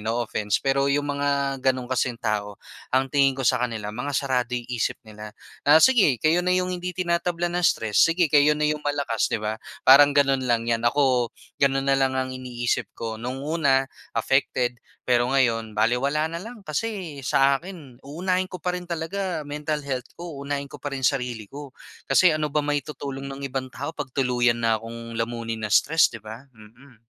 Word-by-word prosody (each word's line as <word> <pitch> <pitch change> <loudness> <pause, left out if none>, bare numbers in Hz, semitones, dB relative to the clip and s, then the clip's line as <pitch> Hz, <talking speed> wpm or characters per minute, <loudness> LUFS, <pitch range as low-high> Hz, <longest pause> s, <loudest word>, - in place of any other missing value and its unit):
no 115 +3 -1
offense, 105 -1 -1
pero 140 0 +1
'yong 145 +1 +1
mga 145 0 -1 0.3
gano'n 130 -1 0
kasing 125 -2 0
tao, 105 -3 -2 0.4
ang 135 +1 +2
tingin 135 0 +3
ko 135 - -3
sa 125 -1 +3
kanila 110 -3 -4
mga 140 +5 -4
sarado 125 -3 0
yung 120 0 -6
isip 115 - -1
nila. 105 0 -10 0.3
Na 150 +2 +7
sige 215 - +5
kayo 160 +3 +3
na 180 - +2
'yong 185 0 +1
hindi 180 0 -4
tinatablan 175 0 -1
ng 180 - 0
stress, 110 -8 +2
sige 165 -1 +2
kayo 145 +1 +6
na 150 - 0
'yong 150 0 -1
malakas, 145 -6 0
'di - - +2
ba, 110 +1 -2 0.3
parang 140 +2 +8
gano'n 135 -2 +3
lang 115 -1 +2
'yan. 115 -1 +1
Ako 125 -2 +2 0.3
gano'n 135 0 +2
na 135 - +4
lang 135 -1 +2
ang 130 0 -1
iniisip 125 -2 -2
ko. 110 -1 -4
No'ng 130 +3 -4
una 140 -4 +2 0.3
affected, 125 0 0 0.2
pero 120 0 +2
ngayon 115 -5 +1
balewala 130 +7 +1
na 170 +1 -5
lang, 220 -1 -10
kasi 170 -3 -4
sa 135 +1 +3
akin 160 -9 -11
uunahin 180 +6 -2
ko 180 - -7
pa 180 - +1
rin 180 -1 -8
talaga 170 0 -3
mental 150 +1 -3
health 130 -2 -4
ko. 170 -5 -8
Unahin 140 0 -3
ko 145 - -10
pa 145 - -4
rin 130 - -5
sarili 125 -6 0
ko, 145 -1 -9 0.3
kasi 180 -3 +5
ano 155 -1 -1
ba 150 0 0
maitutulong 140 -2 -4
ng 140 0 -7
ibang 130 -1 -3
tao 145 +5 -6
'pag 145 -3 -5
tuluyan 125 -2 +2
na 110 -1 +2
kong 115 0 -7
lamunin 115 -1 -3
ng - - -4
stress, 160 +3 +5
'di 115 - -10
ba? 115 +6 -10
Mm. 115 +2 -18
135 Hz, 190 wpm, -24 LUFS, 120-150 Hz, 0.4 s, parang